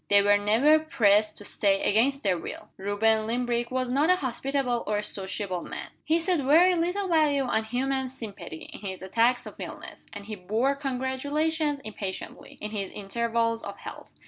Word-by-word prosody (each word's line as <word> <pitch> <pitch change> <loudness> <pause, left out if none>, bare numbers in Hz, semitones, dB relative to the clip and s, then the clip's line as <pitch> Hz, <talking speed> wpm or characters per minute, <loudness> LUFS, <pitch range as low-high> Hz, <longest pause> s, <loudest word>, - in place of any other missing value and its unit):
They 200 0 +5
were 205 0 +5
never 235 +10 +4
pressed 215 -8 +2
to 205 - -10
stay 195 -1 +1
against 265 +7 +2
their 195 -3 +2
will. 165 - -7
Reuben 215 +3 +1
Limbrick 240 0 -1
was 255 0 -1
not 290 +6 +3
a 365 - +7
hospitable 260 -3 -1
or 210 - +1
a 205 - -2
sociable 190 -2 -2
man. - - -6
He 320 - +2
set 345 0 +1
very 320 +7 +5
little 355 +4 0
value 305 -5 +3
on 220 -3 0
human 265 +3 -1
sympathy, 200 -10 -8
in - - -9
his 190 -2 -6
attacks 230 +6 +2
of - - -10
illness; - - -8
and 205 -1 -9
he 215 - -6
bore 215 +9 0
congratulations 285 +3 -1
impatiently, 205 -4 -7
in 210 - -5
his 200 -3 -3
intervals 230 +2 -1
of - - -7
health. - - -10
235 Hz, 175 wpm, -27 LUFS, 205-280 Hz, -, a